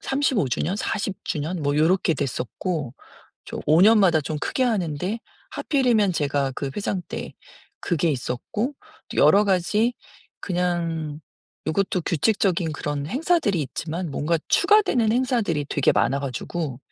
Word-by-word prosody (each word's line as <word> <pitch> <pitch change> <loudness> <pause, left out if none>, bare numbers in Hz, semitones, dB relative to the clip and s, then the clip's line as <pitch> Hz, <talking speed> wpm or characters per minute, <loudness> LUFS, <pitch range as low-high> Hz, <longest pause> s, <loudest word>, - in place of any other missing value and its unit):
35 270 - 0
주년 170 +10 -1
40 200 -2 -2
주년 160 +1 -2
뭐 145 +1 0
요렇게 165 +1 +3
됐었고 140 +1 -3 0.5
좀 - - -6
5 160 +4 +5
년마다 195 -7 +5
좀 155 0 -3
크게 260 - -1
하는데 190 -2 -1 0.3
하필이면 240 - +2
제가 140 -3 0
그 140 -2 -3
회장 200 -3 -2
때 - - -6 0.5
그게 170 -2 0
있었고 150 - -3 0.4
또 - - -8
여러 205 +1 +6
가지 205 +5 +2 0.5
그냥 170 -4 -2 0.5
요것도 180 +2 0
규칙적인 180 -2 +1
그런 145 -1 -3
행사들이 275 - +1
있지만 165 +4 -4
뭔가 160 +4 0
추가되는 360 - +4
행사들이 235 - 0
되게 145 - +2
많아 140 +1 +1
가지고 140 +1 -4
175 Hz, 270 characters per minute, -24 LUFS, 150-210 Hz, 0.5 s, 여러